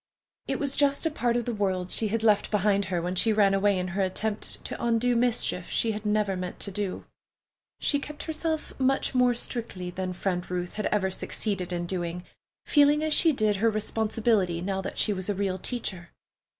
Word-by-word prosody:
It - - -1
was 280 -1 -1
just 285 +1 +2
a 320 - +2
part 240 -5 0
of 240 - -2
the 240 - -2
world 185 -3 -1
she 220 - +3
had 220 +2 -1
left 210 -2 +3
behind 200 -1 +2
her 180 -2 -1
when 180 +1 -2
she 220 +5 +2
ran 205 -2 +4
away 195 0 +3
in 180 0 -2
her 190 +2 -1
attempt 205 +3 -2
to - - -5
undo 235 +1 +2
mischief 235 -7 +1
she 225 - +1
had 210 0 -4
never 210 -2 +1
meant 180 -1 -5
to 200 - -1
do. 195 -1 -4 0.7
She 285 - +2
kept 295 +1 -7
herself 320 0 -3
much 270 +1 +1
more 250 -1 +3
strictly 220 -7 -3
than 185 0 -3
Friend 180 -1 -2
Ruth 180 -1 -3
had 215 - -2
ever 190 -2 0
succeeded 185 -1 -2
in 175 -1 -2
doing, 175 -1 -3 0.4
feeling 295 +1 +4
as 310 -1 +1
she 325 - +5
did 215 -7 +1
her 225 +3 +3
responsibility, 215 -4 +1
now 190 +2 -2
that 195 - -6
she 210 - +3
was 185 0 -3
a 205 - 0
real 190 -1 -1
teacher. 185 -7 -3
210 Hz, 200 wpm, -27 LUFS, 185-235 Hz, 0.7 s, she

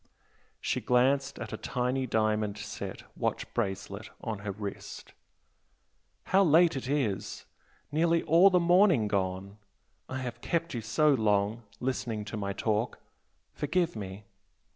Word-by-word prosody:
She - - -1
glanced 135 +2 +2
at 120 -2 -6
a - - -3
tiny 125 +1 -1
diamond 110 -2 0
set 105 - -6
watch - - -1
bracelet 100 +2 -3
on 110 -4 -4
her 105 0 -4
wrist 100 0 -7 1.1
"How 195 +1 +4
late 165 -1 +5
it 130 -1 -4
is! 130 -9 -1 0.5
nearly 165 +2 +2
all 170 +5 +6
the 180 -2 +4
morning 175 - +4
gone! 100 0 -2 0.5
I 130 - -3
have 120 -2 -5
kept 170 +2 -1
you 120 - -3
so 150 +7 +3
long 105 -1 +1 0.2
listening 120 -4 -2
to 105 - -6
my 100 -2 -2
talk 110 +3 -1 0.6
forgive 165 +2 0
me! 100 -1 -7
120 Hz, 135 wpm, -29 LUFS, 105-150 Hz, 1.1 s, all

